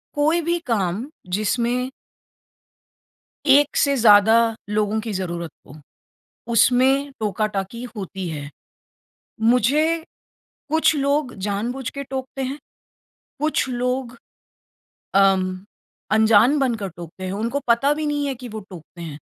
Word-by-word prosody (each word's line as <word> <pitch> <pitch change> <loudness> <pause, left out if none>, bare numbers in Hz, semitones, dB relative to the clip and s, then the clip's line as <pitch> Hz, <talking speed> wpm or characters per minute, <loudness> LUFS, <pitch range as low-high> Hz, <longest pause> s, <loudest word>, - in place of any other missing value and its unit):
कोई 310 +4 +2
भी 340 +2 0
काम, 205 0 0 0.3
जिसमें 240 +4 0 1.6
1 285 +2 +5
से 280 -1 +3
ज़्यादा 220 -1 +6 0.3
लोगों 210 +1 0
की 220 0 -5
ज़रूरत 170 -4 -4 0.2
हो, 145 - -12 0.8
उसमें 265 +4 +4
टोका-टाकी 210 +1 -2
होती 190 -2 -5
है। 145 -2 -6 0.9
मुझे 290 +8 +2 0.7
कुछ 315 0 +3
लोग 280 -1 0
जानबूझ 235 +6 -2
के 280 - -6
टोकते 265 0 -5
हैं। 270 +3 -3 0.8
कुछ 305 -3 +1
लोग 250 0 -2 1.0
अम, 190 -1 +3 0.5
अनजान 220 +6 +5
बनकर 230 -7 0
टोकते 175 +2 -9
हैं। 185 - -3
उनको 230 +7 -2
पता 275 +5 +4
भी 305 0 -3
नहीं 290 -1 -1
है 270 - -2
कि 250 0 -9
वो 215 0 -6
टोकते 170 0 -12
हैं। 150 -3 -7
235 Hz, 120 wpm, -22 LUFS, 200-275 Hz, 1.6 s, ज़्यादा